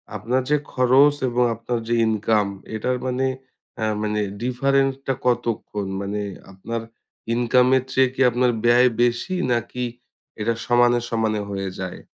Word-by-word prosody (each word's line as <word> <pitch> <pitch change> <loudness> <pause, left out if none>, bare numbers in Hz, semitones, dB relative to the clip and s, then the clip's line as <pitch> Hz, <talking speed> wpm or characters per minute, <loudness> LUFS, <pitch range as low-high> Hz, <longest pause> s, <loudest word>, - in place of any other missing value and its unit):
আপনার 120 +6 0
যে 150 - +4 0.2
খরচ 130 +3 +5
এবং 125 +1 +2
আপনার 115 +2 -3
যে 120 - 0
ইনকাম 110 -1 +1 0.3
এটার 125 +4 -1
মানে 130 +1 0 0.5
অ্যা 110 - -1 0.2
মানে 105 0 0 0.2
ডিফারেন্ট 135 +2 +1
টা 135 - +2
কতক্ষণ? 115 -4 -1
মানে 100 +1 -3 0.3
আপনার, 115 +4 -5 0.5
ইনকামের 125 +2 +3
চেয়ে 130 -1 +4
কি 130 - -3
আপনার 125 +1 +2
ব্যয় 120 +2 +6
বেশি 120 +10 0 0.2
নাকি 120 +1 -2 0.5
এইটা 115 +2 0
সমানে, 120 0 +4
সমানে 110 -2 0
হয়ে 95 -1 -3
যায়? 95 -1 -5
120 Hz, 140 wpm, -22 LUFS, 110-125 Hz, 0.5 s, ব্যয়